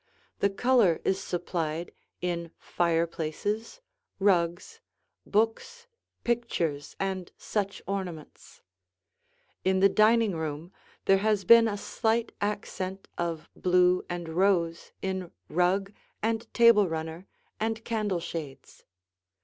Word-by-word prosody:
The 200 - +3
color 205 -4 +3
is 190 0 +1
supplied 170 -2 -3 0.3
in 170 -1 -2
fireplaces, 170 - -1 0.4
rugs, 175 -2 +1 0.5
books, 225 - 0 0.4
pictures, 175 -12 -1
and 190 -2 -3
such 200 -2 -3
ornaments. 180 -5 -6 1.0
In 190 0 +2
the 195 +1 +6
dining 215 -1 +4
room, 160 +2 -5 0.3
there 195 0 +5
has 210 -2 +1
been 230 +3 +8
a 205 -2 -2
slight 225 +2 0
accent 195 -2 -3
of 170 -2 -2
blue 180 0 +3
and 175 -2 -4
rose 170 -1 +1
in 190 -2 -2 0.2
rug 190 +4 +1 0.3
and 225 +1 -1
table 230 -5 +6
runner 160 +3 -5 0.3
and 225 +1 -2
candle 210 -5 -1
shades. 155 -6 -7
190 Hz, 105 wpm, -28 LUFS, 170-215 Hz, 1.0 s, been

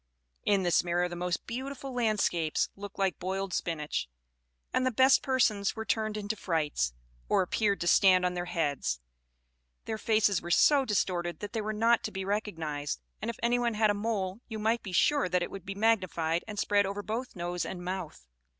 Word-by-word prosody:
In 200 -2 +3
this 175 -1 +3
mirror 175 0 +1
the 175 - -6
most 175 0 -2
beautiful 265 +2 -5
landscapes 210 -9 +1
looked 200 0 -9
like 195 -2 0
boiled 190 0 -3
spinach, 150 - -2 0.6
and 255 - +2
the 255 - +3
best 260 +3 +5
persons 220 -7 +1
were 220 -1 -5
turned 215 -1 0
into 210 +1 -3
frights, 150 - -1 0.4
or - - +4
appeared 200 +2 0
to 170 - -1
stand 185 0 +5
on 180 - +1
their 175 0 -3
heads; 145 - -1 0.9
their 220 -1 -3
faces 215 -4 +2
were 175 - -7
so 275 +9 +5
distorted 180 -5 -1
that 205 +1 -6
they 225 - -1
were 215 +1 -2
not 230 +2 +3
to - - -3
be 190 -1 -4
recognised; 165 - -2 0.2
and - - -2
if 235 - -4
anyone 240 -1 +2
had 215 0 +4
a - - +1
mole, 205 -2 -2
you 220 - -5
might 225 +2 +1
be 195 - -7
sure 280 +6 +3
that 180 0 +1
it - - -5
would 195 -1 -9
be 195 - -4
magnified 185 -6 +1
and 210 -1 -7
spread 205 -1 +2
over 200 +1 -4
both 235 +5 -4
nose 175 0 -2
and 180 -1 -6
mouth. 180 - -5
200 Hz, 195 wpm, -30 LUFS, 175-220 Hz, 0.9 s, best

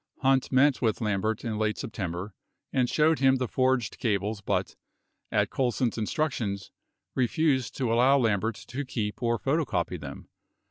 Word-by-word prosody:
48 135 - -2
Hunt 135 -1 +2
met 135 +1 +4
with 110 -3 +1
Lambert 110 0 -1
in 110 -2 -2
late 110 0 0
September 100 -5 -4 0.4
and 125 -2 +2
showed 155 -1 +3
him 135 0 +5
the 130 -1 -1
forged 130 -4 0
cables 105 -1 -1
but, - - -1 0.6
at - - +1
Colson's 125 -2 0
instructions, 110 - -2 0.4
refused 130 0 +1
to 125 -4 0
allow 130 +4 +5
Lambert 110 -3 +1
to 135 +7 -6
keep 110 -5 -4
or 120 -1 +1
photocopy 145 +6 -1
them. - - -8
120 Hz, 150 wpm, -28 LUFS, 110-130 Hz, 0.6 s, him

